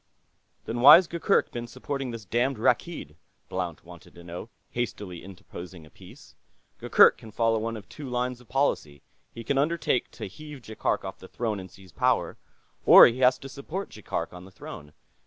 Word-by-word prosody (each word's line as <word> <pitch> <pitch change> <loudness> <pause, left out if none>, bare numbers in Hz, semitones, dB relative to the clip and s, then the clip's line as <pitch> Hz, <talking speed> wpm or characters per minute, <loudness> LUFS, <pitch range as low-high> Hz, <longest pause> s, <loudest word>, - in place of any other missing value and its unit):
"Then 120 +1 -3
why's 170 +8 +10
Gurgurk 170 +4 +1
been 120 0 -5
supporting 135 +2 -5
this 115 -3 -7
damned 120 +6 0
Rakkeed?" 115 - -1 0.3
Blount 90 -4 -4
wanted 85 -1 -14
to 85 - -13
know, 85 +6 -8 0.2
hastily 105 -7 -5
interposing 90 -2 -11
a 75 - -19
piece. - - -16 0.5
"Gurgurk - - +5
can 110 - -12
follow 115 +1 +1
one 115 +1 -3
of 105 - -12
two 145 -3 -9
lines 125 0 -2
of 125 - -21
policy. 75 - -1 0.3
He 115 - -9
can 135 +3 0
undertake 150 -4 0
to - - -7
heave 145 +6 -10
Jaikark 110 -1 -2
off 95 0 -7
the 95 - -12
throne 110 -2 -3
and 95 0 -9
seize 95 -2 -17
power, - - 0 0.5
or - - +10
he 120 +2 +1
has 130 0 +4
to 135 - -10
support 155 +8 -6
Jaikark 90 -6 -5
on 90 0 -10
the 95 - -13
throne. 75 -5 -11
115 Hz, 180 wpm, -26 LUFS, 95-130 Hz, 0.5 s, why's